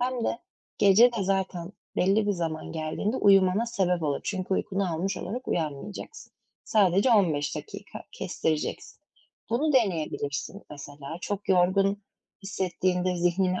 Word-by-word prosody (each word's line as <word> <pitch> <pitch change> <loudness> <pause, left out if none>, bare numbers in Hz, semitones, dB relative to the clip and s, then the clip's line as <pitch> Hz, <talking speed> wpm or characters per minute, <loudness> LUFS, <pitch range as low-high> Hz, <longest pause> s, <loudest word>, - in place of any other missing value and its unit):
hem 250 -1 -1
de - - -1 0.4
gece 220 +5 +6
de 220 -4 -2
zaten 190 -2 -1 0.2
belli 200 +3 +3
bir 205 - +2
zaman 165 -4 -4
geldiğinde 165 +9 -2
uyumana 195 +2 +4
sebep 180 -6 0
olur. 145 -2 0
Çünkü 190 -1 -2
uykunu 195 -3 -1
almış 190 +4 -2
olarak 245 +8 -5
uyanmayacaksın. 165 - -4 0.3
Sadece 200 +2 +3
15 165 -10 +2
dakika - - -8
kestireceksin. 155 -1 -3 0.5
Bunu 290 +6 +1
deneyebilirsin 175 - -1
mesela. 145 +2 -8
Çok 205 +1 -4
yorgun 195 +2 +3 0.4
hissettiğinde 185 -1 -1
zihnini 180 +1 +1
190 Hz, 125 wpm, -27 LUFS, 170-205 Hz, 0.5 s, gece